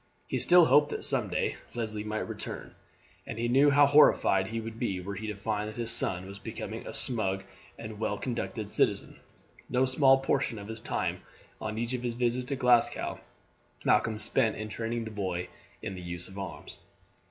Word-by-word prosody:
He -, -, -1 dB
still 175 Hz, -1 st, +7 dB
hoped 145 Hz, -1 st, +5 dB
that -, -, -4 dB
some -, -, +4 dB
day -, -, -1 dB, 0.2 s
Leslie 110 Hz, -3 st, -3 dB
might 110 Hz, 0 st, -3 dB
return, -, -, -7 dB, 0.5 s
and 115 Hz, -, -5 dB
he 120 Hz, +1 st, 0 dB
knew 135 Hz, +4 st, +5 dB
how 145 Hz, +1 st, +6 dB
horrified 140 Hz, -9 st, +5 dB
he 115 Hz, +2 st, -3 dB
would 115 Hz, 0 st, -7 dB
be 100 Hz, -6 st, -1 dB
were 95 Hz, +2 st, -5 dB
he 110 Hz, +2 st, -5 dB
to 105 Hz, -, -3 dB
find 105 Hz, +1 st, -2 dB
that 110 Hz, -, -10 dB
his 115 Hz, -1 st, +1 dB
son 95 Hz, -5 st, +1 dB
was 100 Hz, +1 st, -9 dB
becoming -, -, -6 dB
a -, -, -5 dB
smug 95 Hz, -6 st, 0 dB, 0.3 s
and 110 Hz, -2 st, -8 dB
well 105 Hz, -2 st, -1 dB
conducted 115 Hz, -4 st, -4 dB
citizen. -, -, 0 dB, 0.5 s
No 125 Hz, +1 st, +3 dB
small 135 Hz, +1 st, +5 dB
portion 135 Hz, -3 st, 0 dB
of 100 Hz, +1 st, -8 dB
his 110 Hz, 0 st, -5 dB
time -, -, -2 dB, 0.4 s
on 110 Hz, 0 st, -4 dB
each 120 Hz, +2 st, -2 dB
of 125 Hz, -, -2 dB
his 120 Hz, -1 st, -3 dB
visits 125 Hz, +1 st, 0 dB
to 140 Hz, -, -1 dB
Glasgow 125 Hz, -3 st, +2 dB, 0.7 s
Malcolm 110 Hz, -2 st, +3 dB
spent 110 Hz, +2 st, +1 dB
in 110 Hz, 0 st, -5 dB
training 115 Hz, +1 st, -3 dB
the 110 Hz, -, -6 dB
boy 95 Hz, -4 st, -3 dB, 0.3 s
in -, -, -4 dB
the 90 Hz, -, -7 dB
use 85 Hz, 0 st, -5 dB
of 95 Hz, +1 st, -9 dB
arms. 95 Hz, -, -7 dB
110 Hz, 195 wpm, -29 LUFS, 105-125 Hz, 0.7 s, still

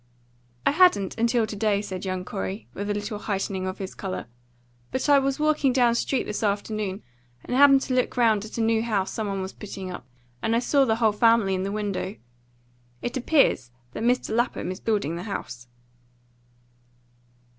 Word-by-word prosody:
"I -, -, +5 dB
hadn't 295 Hz, -, +4 dB
until 235 Hz, 0 st, +2 dB
to 215 Hz, -, -6 dB
day," 205 Hz, -1 st, +1 dB
said 195 Hz, -2 st, -5 dB
young 185 Hz, -1 st, -3 dB
Corey, 95 Hz, -, -5 dB
with 200 Hz, +1 st, -4 dB
a -, -, +1 dB
little 205 Hz, +1 st, -4 dB
heightening 195 Hz, -2 st, -2 dB
of 185 Hz, -, -4 dB
his 190 Hz, -1 st, -6 dB
colour. 190 Hz, -2 st, -5 dB, 0.6 s
"But 260 Hz, -, -2 dB
I 285 Hz, -1 st, +6 dB
was 275 Hz, +1 st, -1 dB
walking 300 Hz, -3 st, +2 dB
down 245 Hz, -2 st, +4 dB
street 260 Hz, +3 st, 0 dB
this 210 Hz, -, -4 dB
afternoon, 205 Hz, -1 st, -2 dB, 0.4 s
and 250 Hz, -, -2 dB
happened 275 Hz, 0 st, +7 dB
to 265 Hz, -, -3 dB
look 250 Hz, 0 st, 0 dB
round 220 Hz, -4 st, +3 dB
at 220 Hz, -, -8 dB
a -, -, 0 dB
new 225 Hz, 0 st, +2 dB
house 210 Hz, -5 st, -1 dB
some 220 Hz, -2 st, -3 dB
one 195 Hz, -1 st, -2 dB
was 190 Hz, -, -6 dB
putting 195 Hz, -3 st, -7 dB
up, 150 Hz, -8 st, -8 dB, 0.3 s
and 225 Hz, -, +1 dB
I -, -, +3 dB
saw 275 Hz, +2 st, +3 dB
the 220 Hz, -3 st, +2 dB
whole 225 Hz, -1 st, +3 dB
family 225 Hz, -2 st, +3 dB
in 185 Hz, -, -1 dB
the 195 Hz, +1 st, -2 dB
window. 205 Hz, -1 st, -3 dB, 0.9 s
It 240 Hz, -, -3 dB
appears 260 Hz, -, +2 dB, 0.2 s
that -, -, -6 dB
Mr. 240 Hz, -1 st, +1 dB
Lapham 240 Hz, -5 st, 0 dB
is 185 Hz, -, -6 dB
building 200 Hz, -8 st, -1 dB
the -, -, -5 dB
house." 120 Hz, -10 st, -6 dB
215 Hz, 190 wpm, -25 LUFS, 195-240 Hz, 0.9 s, happened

